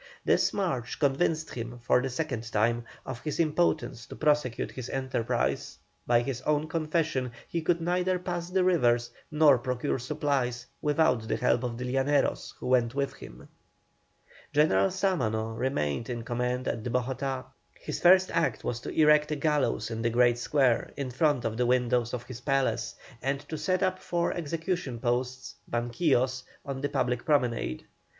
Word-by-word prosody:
This -, -, +3 dB
march 150 Hz, -, -2 dB
convinced 155 Hz, +2 st, +1 dB
him, 120 Hz, 0 st, -5 dB
for 125 Hz, -, +3 dB
the 135 Hz, -, -2 dB
second 125 Hz, -5 st, -3 dB
time, 115 Hz, +2 st, +1 dB, 0.2 s
of 120 Hz, -2 st, -6 dB
his 150 Hz, -2 st, -4 dB
impotence 155 Hz, -6 st, +1 dB
to -, -, -9 dB
prosecute 150 Hz, -6 st, +1 dB
his 130 Hz, -1 st, -7 dB
enterprise; 130 Hz, -3 st, -1 dB, 0.3 s
by 120 Hz, -1 st, +4 dB
his 125 Hz, 0 st, -3 dB
own 150 Hz, +2 st, +1 dB
confession, 155 Hz, -5 st, -1 dB, 0.2 s
he 170 Hz, -, -2 dB
could 170 Hz, +1 st, +1 dB
neither 180 Hz, +2 st, +1 dB
pass 175 Hz, -1 st, -4 dB
the 185 Hz, 0 st, +2 dB
rivers 120 Hz, -10 st, +3 dB, 0.2 s
nor 150 Hz, -4 st, +5 dB
procure 125 Hz, +3 st, -1 dB
supplies 130 Hz, -3 st, -1 dB, 0.2 s
without 150 Hz, -6 st, +2 dB
the -, -, 0 dB
help 120 Hz, -, +2 dB
of 120 Hz, -2 st, -3 dB
the 125 Hz, -, -4 dB
Llaneros 135 Hz, +3 st, 0 dB
who -, -, -7 dB
went 125 Hz, -1 st, +2 dB
with 140 Hz, -1 st, -1 dB
him. -, -, -12 dB, 1.0 s
General 100 Hz, -11 st, +4 dB
Sámano 115 Hz, -, -1 dB
remained 115 Hz, -, -1 dB
in 120 Hz, -2 st, -3 dB
command 125 Hz, +2 st, -2 dB
at 115 Hz, -, -1 dB
Bogotá. 130 Hz, +2 st, -2 dB, 0.3 s
His -, -, -4 dB
first 185 Hz, +1 st, +6 dB
act 140 Hz, -10 st, 0 dB
was 120 Hz, -, -2 dB
to -, -, -7 dB
erect 150 Hz, -1 st, +4 dB
a 150 Hz, -, 0 dB
gallows 150 Hz, -4 st, 0 dB
in 115 Hz, 0 st, -3 dB
the 115 Hz, -, +1 dB
great 120 Hz, 0 st, +3 dB
square, 130 Hz, -2 st, +2 dB
in 135 Hz, -2 st, -3 dB
front 145 Hz, -1 st, +1 dB
of 110 Hz, -1 st, -2 dB
the 125 Hz, 0 st, +2 dB
windows 125 Hz, -1 st, +2 dB
of 125 Hz, -1 st, -4 dB
his 125 Hz, -1 st, -9 dB
palace, 135 Hz, 0 st, 0 dB, 0.3 s
and 135 Hz, +1 st, -1 dB
to 160 Hz, -, -3 dB
set 180 Hz, +5 st, 0 dB
up 185 Hz, 0 st, 0 dB
four 170 Hz, -1 st, -1 dB
execution 165 Hz, -5 st, -3 dB
posts 125 Hz, +2 st, -2 dB, 0.2 s
(banquillos) 125 Hz, +1 st, +1 dB, 0.2 s
on 135 Hz, -2 st, -4 dB
the 145 Hz, -, -1 dB
public 125 Hz, -3 st, 0 dB
promenade. 120 Hz, -, 0 dB
130 Hz, 165 wpm, -28 LUFS, 120-155 Hz, 1.0 s, first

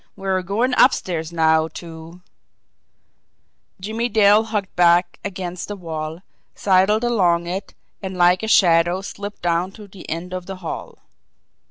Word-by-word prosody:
We 195 Hz, -, -8 dB
are 190 Hz, -1 st, +1 dB
going 220 Hz, +8 st, -1 dB
upstairs 170 Hz, -, +2 dB
now 160 Hz, -1 st, +3 dB
to 165 Hz, +1 st, -10 dB, 0.8 s
" -, -, -48 dB
Jimmie 220 Hz, +5 st, -3 dB
Dale 210 Hz, -1 st, +5 dB
hugged 210 Hz, -3 st, -3 dB
back 175 Hz, 0 st, +3 dB
against 180 Hz, -3 st, -5 dB
the 205 Hz, -, -5 dB
wall, 160 Hz, -1 st, -6 dB, 0.3 s
sidled 200 Hz, +3 st, +2 dB
along 180 Hz, -8 st, +2 dB
it, 185 Hz, +3 st, -5 dB, 0.3 s
and 190 Hz, -2 st, -6 dB
like 180 Hz, +1 st, +4 dB
a 220 Hz, -, -3 dB
shadow 175 Hz, -2 st, +4 dB
slipped 205 Hz, 0 st, -8 dB
down 175 Hz, +2 st, 0 dB
to 210 Hz, -2 st, -12 dB
the 190 Hz, -2 st, -12 dB
end 170 Hz, +3 st, -5 dB
of 180 Hz, -1 st, -5 dB
the 195 Hz, -, -5 dB
hall. 185 Hz, -3 st, -7 dB
185 Hz, 150 wpm, -21 LUFS, 170-200 Hz, 0.8 s, Dale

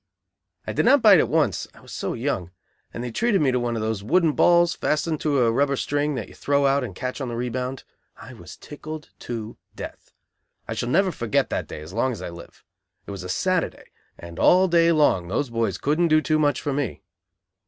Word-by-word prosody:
I -, -, -4 dB
did -, -, +1 dB
not 285 Hz, -3 st, +5 dB
bite 200 Hz, -6 st, +8 dB
at -, -, +1 dB
once, 155 Hz, -1 st, +1 dB
I -, -, -16 dB
was -, -, -13 dB
so -, -, -3 dB
young, 90 Hz, -2 st, -2 dB, 0.4 s
and 120 Hz, -, -6 dB
they 125 Hz, -, -4 dB
treated 215 Hz, -, +1 dB
me 140 Hz, -5 st, +2 dB
to 125 Hz, -, +1 dB
one 120 Hz, -1 st, -2 dB
of 110 Hz, -, -2 dB
those 110 Hz, -2 st, -2 dB
wooden 165 Hz, -, +3 dB
balls 175 Hz, +2 st, +4 dB
fastened 155 Hz, -1 st, -1 dB
to 145 Hz, -4 st, +1 dB
a 115 Hz, -, +3 dB
rubber 140 Hz, +3 st, +1 dB
string 145 Hz, +2 st, -1 dB
that 110 Hz, -6 st, -4 dB
you -, -, -15 dB
throw 140 Hz, 0 st, +1 dB
out 135 Hz, 0 st, +2 dB
and 105 Hz, -7 st, -6 dB
catch 130 Hz, +5 st, -4 dB
on 130 Hz, -, -3 dB
the 120 Hz, -, -4 dB
rebound. 125 Hz, +2 st, -3 dB, 0.3 s
I -, -, -11 dB
was -, -, -12 dB
tickled 155 Hz, +1 st, -9 dB
to 115 Hz, -2 st, -6 dB, 0.2 s
death. -, -, -9 dB, 0.6 s
I -, -, -3 dB
shall 120 Hz, -, -3 dB
never 185 Hz, +7 st, +3 dB
forget 115 Hz, -9 st, -1 dB
that -, -, -2 dB
day -, -, -8 dB
as 80 Hz, +4 st, -10 dB
long 125 Hz, +4 st, +1 dB
as 110 Hz, -, -8 dB
I -, -, -5 dB
live. 85 Hz, 0 st, -13 dB, 0.4 s
It -, -, -8 dB
was 100 Hz, -1 st, -6 dB
a 90 Hz, -, -7 dB
Saturday, 185 Hz, -, -1 dB, 0.3 s
and 85 Hz, 0 st, -10 dB
all 185 Hz, +1 st, +5 dB
day 170 Hz, -1 st, +4 dB
long 145 Hz, -, +3 dB
those 120 Hz, +7 st, -2 dB
boys 115 Hz, -5 st, -1 dB
couldn't 155 Hz, +8 st, +1 dB
do 155 Hz, -1 st, +4 dB
too 155 Hz, 0 st, +1 dB
much 145 Hz, -4 st, +1 dB
for 145 Hz, -, -1 dB
me. 140 Hz, -4 st, -3 dB
140 Hz, 225 wpm, -24 LUFS, 115-155 Hz, 0.6 s, bite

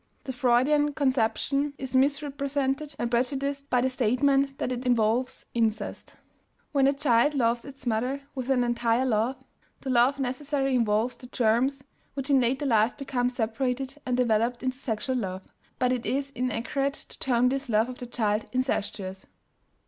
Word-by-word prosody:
The 260 Hz, -, -5 dB
Freudian 265 Hz, +4 st, +3 dB
conception 275 Hz, +2 st, 0 dB
is 265 Hz, -1 st, -5 dB
misrepresented 280 Hz, +1 st, 0 dB
and 240 Hz, 0 st, -2 dB
prejudiced 275 Hz, +3 st, -1 dB
by 250 Hz, -, +3 dB
the 260 Hz, -, +2 dB
statement 270 Hz, +3 st, +2 dB
that -, -, -2 dB
it 250 Hz, 0 st, -3 dB
involves 245 Hz, 0 st, +1 dB
"incest." 225 Hz, -2 st, -2 dB, 0.6 s
When 275 Hz, -2 st, +3 dB
a 275 Hz, -, +4 dB
child 280 Hz, 0 st, +2 dB
loves 235 Hz, -2 st, +1 dB
its 275 Hz, -1 st, -10 dB
mother 250 Hz, +4 st, -1 dB
with 260 Hz, -1 st, -5 dB
an 255 Hz, -2 st, +3 dB
entire 240 Hz, +1 st, +1 dB
love, 235 Hz, +2 st, +1 dB, 0.5 s
that 270 Hz, -, -5 dB
love 250 Hz, +3 st, +4 dB
necessarily 270 Hz, +1 st, -1 dB
involves 230 Hz, 0 st, +1 dB
the 250 Hz, -, -12 dB
germs 250 Hz, +3 st, +1 dB, 0.3 s
which 275 Hz, 0 st, -2 dB
in 270 Hz, -2 st, +5 dB
later 260 Hz, +4 st, 0 dB
life 225 Hz, -2 st, +2 dB
become 255 Hz, -3 st, -1 dB
separated 250 Hz, +4 st, -2 dB
and 250 Hz, -1 st, -1 dB
developed 235 Hz, 0 st, +1 dB
into 255 Hz, 0 st, -2 dB
sexual 255 Hz, +1 st, -2 dB
love, 190 Hz, -4 st, -4 dB, 0.3 s
but 255 Hz, 0 st, +2 dB
it 245 Hz, -2 st, -3 dB
is 275 Hz, +1 st, -1 dB
inaccurate 255 Hz, +3 st, -1 dB
to -, -, -10 dB
term 250 Hz, -1 st, +2 dB
this 270 Hz, 0 st, -3 dB
love 220 Hz, +1 st, +3 dB
of 255 Hz, -1 st, -8 dB
the 245 Hz, -, -6 dB
child 215 Hz, -3 st, 0 dB
"incestuous." 205 Hz, -7 st, -2 dB
255 Hz, 160 wpm, -27 LUFS, 235-275 Hz, 0.6 s, in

